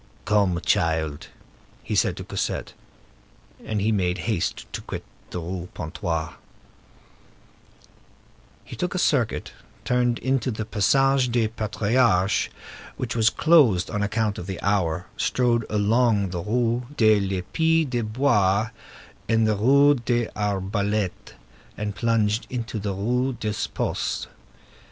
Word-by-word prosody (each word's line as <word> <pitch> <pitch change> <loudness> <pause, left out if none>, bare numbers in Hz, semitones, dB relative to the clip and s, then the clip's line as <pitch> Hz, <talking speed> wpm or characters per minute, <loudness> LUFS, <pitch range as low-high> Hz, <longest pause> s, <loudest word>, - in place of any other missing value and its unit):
"Come, 100 -5 +2
child," 80 -3 0 0.6
he - - -4
said - - +2
to - - -6
Cosette; - - -3 0.9
and 110 -1 -2
he 105 +3 +1
made 90 -3 0
haste 105 -6 -1
to - - -4
quit - - -6 0.3
the 90 - -4
Rue 90 +1 -5
Pontoise. 80 -2 -3 2.3
He - - -9
took - - -3
a - - 0
circuit, - - 0 0.3
turned 125 -1 +2
into 130 0 0
the 110 -2 -3
Passage 135 +5 +2
des 115 -2 +1
Patriarches, 110 -2 +1 0.5
which - - -3
was 110 -1 +4
closed 135 - +4
on 105 - -1
account 105 +1 -1
of 90 - -7
the 95 -2 -5
hour, 90 -4 0
strode 120 -3 +1
along 105 -1 +2
the 90 -1 -3
Rue 120 +4 0
de 110 -2 +5
l'Épée 150 - +1
de 120 -2 -1
Bois 110 -3 +2 0.6
and 115 -1 +3
the 110 - +2
Rue 140 +7 +5
de 120 -2 0
l'Arbalète, 100 0 -2 0.4
and 105 -1 -3
plunged 110 0 +1
into 120 -3 -4
the 100 -1 -3
Rue 125 +6 0
des 105 -3 -3
Postes. - - -2
110 Hz, 130 wpm, -24 LUFS, 100-120 Hz, 2.3 s, de